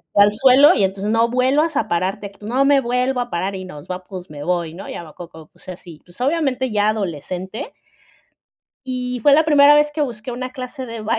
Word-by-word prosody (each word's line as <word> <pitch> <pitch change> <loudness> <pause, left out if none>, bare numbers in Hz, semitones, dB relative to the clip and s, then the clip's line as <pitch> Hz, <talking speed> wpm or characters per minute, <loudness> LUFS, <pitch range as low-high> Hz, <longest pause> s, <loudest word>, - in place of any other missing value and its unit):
Fue 205 - +7
al 205 0 +3
suelo 265 +7 +6
y 195 - +3
entonces, 195 +2 -3
"No 225 +1 +3
vuelvas 270 +6 +1
a 295 - -1
pararte". 195 +4 -2
"No 240 +6 0
me 280 0 +4
vuelvo 250 +1 -1
a 245 0 -3
parar 190 +2 -2
y 185 -1 -7
nos 150 -5 -11
va 180 0 -6
pues 185 -2 -9
me 145 -1 -8
voy", 175 -2 -1
¿no? 190 +4 -9
Y - - -6
a - - -7
lo 155 -2 -14
poco, 160 -2 -12
pues - - -25
así, 175 -3 -10
pues 175 +6 -15
obviamente 265 -3 0
ya 210 0 +1
adolescente 190 - -4 1.1
y 250 -1 -3
fue 285 +4 +5
la 310 +3 +5
primera 290 -1 +6
vez 295 0 +3
que 300 +1 -3
busqué 240 -2 -6
una 255 +1 -5
clase 255 +1 -7
de 230 -2 -7
baile - - -10
225 Hz, 225 wpm, -20 LUFS, 185-260 Hz, 1.1 s, Fue